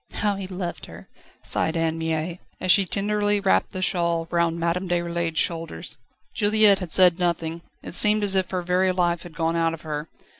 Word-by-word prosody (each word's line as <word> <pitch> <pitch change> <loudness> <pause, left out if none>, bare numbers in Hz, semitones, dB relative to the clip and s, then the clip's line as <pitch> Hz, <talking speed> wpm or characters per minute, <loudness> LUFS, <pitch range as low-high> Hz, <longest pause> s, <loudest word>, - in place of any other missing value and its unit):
"How 205 -1 0
he 195 -1 -6
loved 180 -2 -6
her!" - - -12 0.4
sighed 160 +1 +1
Anne 165 0 -1
Mie, 160 +2 -3 0.2
as 185 - +2
she 195 +1 +5
tenderly 205 +2 0
wrapped 195 -1 +1
the 185 - -5
shawl 170 -3 0
round 170 -1 +1
Madame 175 +2 -1
Déroulède's 170 -1 -2
shoulders. 165 - -3 0.3
Juliette 210 -1 +4
had 180 -4 -6
said 180 -1 +5
nothing; 170 -1 -2 0.2
it - - -8
seemed 210 +3 +5
as 200 -1 +2
if 190 -1 0
her 180 -1 -3
very 185 +1 +1
life 175 -2 0
had 175 -2 -12
gone 165 0 0
out 165 -1 0
of 160 - -17
her. 150 0 -5
175 Hz, 190 wpm, -24 LUFS, 165-190 Hz, 0.4 s, she